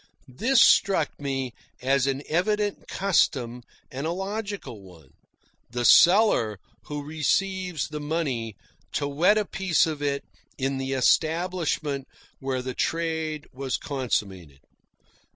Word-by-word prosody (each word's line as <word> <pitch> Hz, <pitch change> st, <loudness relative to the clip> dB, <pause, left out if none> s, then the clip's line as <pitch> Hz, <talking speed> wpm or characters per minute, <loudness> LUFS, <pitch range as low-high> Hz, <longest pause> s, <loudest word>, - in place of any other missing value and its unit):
This 230 Hz, -, +3 dB
struck 195 Hz, -6 st, +4 dB
me 135 Hz, -3 st, -3 dB, 0.3 s
as 135 Hz, +1 st, +2 dB
an 135 Hz, +1 st, -1 dB
evident 205 Hz, +5 st, 0 dB
custom, 130 Hz, -11 st, +1 dB, 0.3 s
and 135 Hz, +4 st, -4 dB
a -, -, -1 dB
logical 200 Hz, -, -5 dB
one 85 Hz, -8 st, -16 dB, 0.6 s
the 120 Hz, +1 st, -2 dB
seller, 175 Hz, -, +6 dB, 0.3 s
who 145 Hz, -1 st, -5 dB
receives 175 Hz, +3 st, -1 dB
the 150 Hz, 0 st, -5 dB
money, 145 Hz, -8 st, -2 dB, 0.4 s
to 145 Hz, -, -1 dB
wet 170 Hz, +9 st, +3 dB
a 210 Hz, -, +1 dB
piece 185 Hz, -4 st, +1 dB
of 155 Hz, -3 st, -4 dB
it 140 Hz, -1 st, -1 dB, 0.3 s
in 135 Hz, 0 st, -1 dB
the 135 Hz, 0 st, -2 dB
establishment 155 Hz, 0 st, +1 dB, 0.3 s
where 130 Hz, -1 st, -2 dB
the 130 Hz, 0 st, -4 dB
trade 160 Hz, -2 st, -2 dB
was 130 Hz, 0 st, -2 dB
consummated. 95 Hz, -, -3 dB
145 Hz, 120 wpm, -26 LUFS, 130-175 Hz, 0.6 s, seller